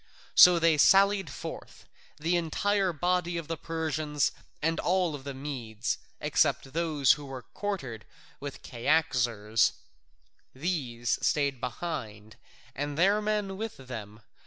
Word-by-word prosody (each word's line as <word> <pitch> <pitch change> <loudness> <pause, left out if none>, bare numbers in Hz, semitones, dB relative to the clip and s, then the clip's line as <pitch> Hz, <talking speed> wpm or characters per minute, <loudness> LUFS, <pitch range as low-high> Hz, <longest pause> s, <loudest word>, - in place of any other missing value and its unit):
So 180 -1 +9
they 165 -2 +3
sallied 195 0 +5
forth, - - -8 0.3
the 165 +4 0
entire 190 +3 +1
body 175 +2 0
of 165 -3 -5
the 165 - -2
Persians 155 -3 -1 0.3
and 165 +2 0
all 180 -4 +1
the 140 -1 -7
Medes, 130 -5 -4 0.2
except 135 - +1
those 155 -5 +3
who 145 0 0
were 130 -2 -7
quartered 135 - -5 0.3
with 140 -1 -8
Cyaxares: 120 -6 +1 0.8
these 130 -7 -1
stayed 140 -4 +1
behind, 115 -6 -5 0.4
and 145 +2 -4
their 200 +5 +4
men 210 -2 -1
with 220 +1 -5
them. 110 -5 -8
150 Hz, 120 wpm, -29 LUFS, 130-175 Hz, 0.8 s, So